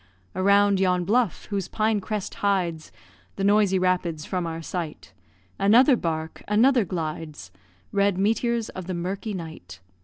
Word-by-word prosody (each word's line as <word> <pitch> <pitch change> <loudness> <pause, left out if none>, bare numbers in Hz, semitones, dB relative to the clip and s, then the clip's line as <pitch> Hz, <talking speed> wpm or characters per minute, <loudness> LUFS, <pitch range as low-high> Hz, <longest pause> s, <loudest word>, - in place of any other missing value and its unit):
Around 200 +1 +4
yon 180 -2 +1
bluff, 225 -1 +1
whose 195 -3 -2
pine 215 -1 0
crest 210 0 -4
hides 180 -6 0 0.4
The 195 - -3
noisy 200 -1 +3
rapids 180 -4 0
from 180 -3 -2
our 165 0 -4
sight, 155 - -6 0.5
Another 245 +7 +6
bark 160 -5 -4
another 235 +2 +4
glides 155 - -5 0.4
Red 200 -2 +2
meteors 225 +3 0
of 185 -2 -8
the 185 - -3
murky 195 +4 -4
night. 160 - -9
190 Hz, 140 wpm, -25 LUFS, 170-205 Hz, 0.5 s, Another